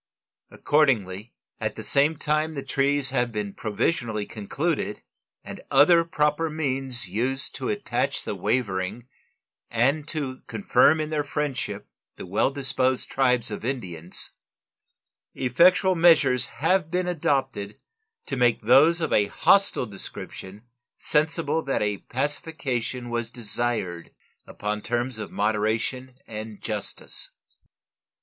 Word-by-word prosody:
Accordingly, 115 -9 +1 0.2
at - - -2
the - - -7
same 145 +3 +3
time 155 +2 0
the 140 - -4
treaties 140 0 +1
have 120 -1 0
been 105 -2 -4
provisionally 110 -1 -1
concluded 130 +4 -3 0.4
and - - -9
other 170 -2 +6
proper 150 0 0
means 135 -6 -2
used 125 +8 -1
to - - -4
attach - - -1
the - - -3
wavering 105 -1 -1 0.6
and 135 +6 +1
to 135 -5 -4
confirm 160 -5 +3
in 155 0 -3
their 150 -1 0
friendship 145 -2 -3 0.3
the - - -8
well 95 +7 +1
disposed 130 -2 -1
tribes 125 -4 +2
of 105 - -5
Indians, 90 -10 -4 1.0
effectual 180 +9 +4
measures 160 -7 +5
have 165 +1 +1
been 180 +1 -1
adopted 135 - -1 0.5
to 135 - -3
make 120 -3 +2
those 145 +9 +5
of 160 - 0
a 105 -1 +4
hostile 195 - +3
description 100 0 -8 0.3
sensible 155 0 +1
that 135 -7 -1
a 105 -1 -1
pacification 130 -3 -3
was 120 -1 -2
desired 115 -7 -2 0.4
upon 105 0 -3
terms 120 0 -2
of - - -6
moderation 110 +5 -1
and 110 -1 -7
justice. 105 -2 -6
130 Hz, 120 wpm, -25 LUFS, 110-150 Hz, 1.0 s, other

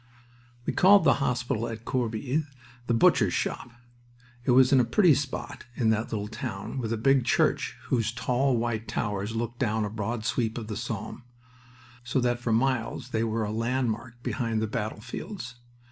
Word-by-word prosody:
We - - -1
called 200 +2 +6
the - - +3
hospital 125 -2 0
at 115 0 -7
Corbie 125 +4 -1 0.4
the 120 - +2
"Butcher's 115 - +4
Shop." 120 - -2 0.8
It - - -1
was 130 +1 +6
in 135 - +7
a - - +5
pretty 165 - +5
spot 140 0 -4
in 110 -3 +2
that 110 +1 -1
little 105 -2 -2
town 110 0 -5
with 115 -3 -3
a 115 - 0
big 135 +3 +3
church 120 - +1
whose 115 -3 0
tall 125 +2 +1
white 115 -1 -2
towers 105 +1 -2
looked 115 +1 -3
down 110 -3 +1
a 105 - -5
broad 110 +1 -3
sweep 115 -3 0
of 115 -2 -6
the 105 - -3
Somme, 115 +1 -5 0.8
so 125 +2 0
that 120 -1 +1
for 120 -1 -2
miles 125 +1 0
they 110 -2 0
were 115 0 -1
a 105 - -3
landmark 120 0 -2
behind 115 -3 -1
the 110 - 0
battlefields. 115 - -5
115 Hz, 175 wpm, -27 LUFS, 110-125 Hz, 0.8 s, in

